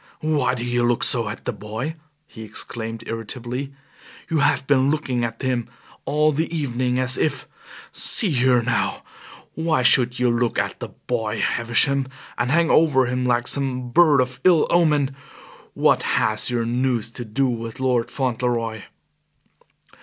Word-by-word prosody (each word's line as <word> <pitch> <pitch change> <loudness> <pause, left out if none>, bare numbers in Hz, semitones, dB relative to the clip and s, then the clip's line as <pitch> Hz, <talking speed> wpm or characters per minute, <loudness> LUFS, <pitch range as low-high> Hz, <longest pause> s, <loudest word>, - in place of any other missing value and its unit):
"Why 145 -5 +1
do 120 -1 -4
you 120 0 0
look 120 0 +1
so 115 -4 +2
at 105 - -8
the - - -2
boy!" 110 +9 -5 0.3
he 115 - -12
exclaimed 115 +1 -6
irritably. 120 +4 -5 0.6
"You 160 - +2
have 140 - +2
been 135 -1 +3
looking 135 -5 -1
at 115 +2 -4
him 125 -3 -1 0.4
all 150 +1 +2
the 160 +3 -2
evening 125 -5 -1
as 130 0 +2
if 140 -3 -1 0.5
See 205 -6 -1
here 125 -3 +3
now, 120 0 -1 0.5
why 160 -5 0
should 125 0 +4
you 125 -1 +2
look 120 -1 0
at - - -2
the - - -5
boy, 110 -3 -3
Havisham, 130 +4 +1 0.3
and 120 +1 -1
hang 165 +3 +3
over 145 -5 +4
him 125 +1 -1
like 120 0 +1
some 130 -3 -1
bird 155 -3 +5
of 125 0 -4
ill 175 -4 +5
omen! 150 -5 +2 0.6
What - - +3
has 110 +2 +1
your 120 -2 -1
news 120 -1 0
to 120 - -4
do 120 +5 -1
with 115 0 -5
Lord 125 -3 0
Fauntleroy?" 120 -4 -2
125 Hz, 155 wpm, -22 LUFS, 120-140 Hz, 0.6 s, bird